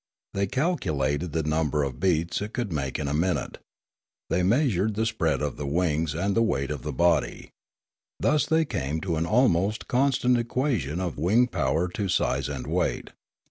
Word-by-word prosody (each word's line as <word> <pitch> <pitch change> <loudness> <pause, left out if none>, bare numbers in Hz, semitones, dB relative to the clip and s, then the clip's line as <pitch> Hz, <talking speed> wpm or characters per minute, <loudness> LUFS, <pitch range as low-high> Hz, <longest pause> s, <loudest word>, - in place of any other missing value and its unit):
They 100 0 0
calculated 85 - -1
the 80 +1 -1
num 75 0 0
ber 75 -1 0
of 65 -3 -4
beats 85 -2 +1
it 105 +2 -5
could 115 -8 -2
make 70 -3 -2
in 75 -2 -3
a 70 - -1
minute. 85 +4 -1 0.7
They 90 - +2
measured 110 - +2
the 110 +2 0
spread 85 -10 0
of 75 - -3
the 70 - -4
wings 80 -1 0
and 95 +4 0
the 115 - +3
weight 70 -11 0
of 75 -4 -4
the - - -4
body. 85 0 +1 0.7
Thus 150 -2 +2
they 160 0 +3
came 80 - -2
to 85 -4 -1
an 80 +2 -1
almost 105 -3 +2
constant 125 -1 +2
equation 115 - -1
of 90 -6 -3
wing 105 +10 +4
power 80 - 0
to 100 +2 -3
size 85 - 0
and 70 -3 -5
weight. - - -1
90 Hz, 180 wpm, -26 LUFS, 75-115 Hz, 0.7 s, wing